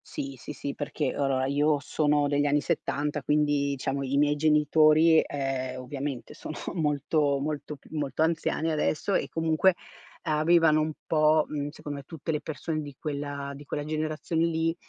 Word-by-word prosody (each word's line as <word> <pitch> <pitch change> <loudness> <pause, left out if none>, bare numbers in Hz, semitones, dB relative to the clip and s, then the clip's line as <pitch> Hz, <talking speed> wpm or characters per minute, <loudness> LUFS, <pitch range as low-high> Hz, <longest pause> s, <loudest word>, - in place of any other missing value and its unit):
Sì, 135 -1 -5
sì, 130 - -9
sì, 140 -1 -5
perché, 145 -1 -2
allora 135 -2 0
io 145 +2 +2
sono 145 0 +1
degli 145 0 +1
anni 145 +1 +3
'70, 150 -2 -1
quindi 145 0 +1
diciamo 135 +1 -2
i 135 +1 -1
miei 145 0 +3
genitori, 155 +1 +5
ehm, 130 -2 -3
ovviamente 135 0 -5
sono - - -7 0.2
molto, 150 -2 +1
molto 150 +1 -4
p 140 - -24
molto 150 0 -1
anziani 160 0 0
adesso 155 +5 0
e - - 0
comunque, 165 +3 +2 0.5
avevano 155 0 +4
un 155 0 -1
po' 155 -1 +3
mhmm, 145 -1 -3
secondo 145 -1 -7
me, - - -10
tutte 160 +1 -5
le 150 - -1
persone 155 0 -4
di 145 -2 -8
quella 145 -1 -4
di 145 - -10
quella 145 - -3
generazione 155 +1 -1
lì, 165 0 0
150 Hz, 165 wpm, -27 LUFS, 140-155 Hz, 0.5 s, genitori